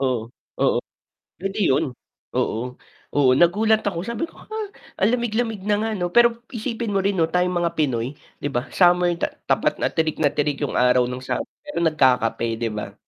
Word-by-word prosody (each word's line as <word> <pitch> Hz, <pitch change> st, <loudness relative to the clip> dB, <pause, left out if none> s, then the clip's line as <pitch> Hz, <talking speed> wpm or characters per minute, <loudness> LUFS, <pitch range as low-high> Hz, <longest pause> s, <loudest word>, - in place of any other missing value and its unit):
Oh, 130 Hz, -3 st, +1 dB, 0.4 s
oo. -, -, +3 dB, 0.6 s
Pwede 195 Hz, +3 st, -4 dB
'yun. 135 Hz, -, +3 dB, 0.5 s
Oo, 110 Hz, -, 0 dB, 0.5 s
oo, 140 Hz, -3 st, +5 dB
nagulat 215 Hz, +6 st, +4 dB
ako 190 Hz, -5 st, -2 dB
sabi 235 Hz, -1 st, -4 dB
ko, -, -, -23 dB
"Huh?" 435 Hz, -1 st, -4 dB, 0.4 s
Ang 195 Hz, -, +5 dB
lamig 235 Hz, -2 st, -2 dB
lamig 225 Hz, -3 st, -1 dB
na 210 Hz, -, +3 dB
nga 225 Hz, -, -1 dB
'no. 175 Hz, -, 0 dB
Pero 240 Hz, 0 st, +8 dB, 0.3 s
isipin 230 Hz, -2 st, -3 dB
mo 195 Hz, -, +3 dB
rin 195 Hz, -1 st, 0 dB
tayong 180 Hz, 0 st, +1 dB
mga 170 Hz, -1 st, 0 dB
Pinoy 130 Hz, -3 st, 0 dB, 0.2 s
'di 145 Hz, -, -2 dB
ba 120 Hz, +1 st, -1 dB
summer 175 Hz, -1 st, +4 dB
ta -, -, +1 dB, 0.2 s
tapat -, -, +2 dB
na -, -, +2 dB
tirik 160 Hz, -1 st, 0 dB
na 145 Hz, -, +4 dB
tirik 145 Hz, 0 st, -1 dB
yung 145 Hz, -, -1 dB
araw 125 Hz, 0 st, +4 dB
ng 125 Hz, 0 st, -5 dB
summer -, -, -2 dB, 0.2 s
pero 295 Hz, -, -4 dB
nagkakape 130 Hz, -8 st, +2 dB
'di 115 Hz, -1 st, -1 dB
ba? 100 Hz, -1 st, -5 dB
175 Hz, 190 wpm, -23 LUFS, 130-210 Hz, 0.6 s, Pero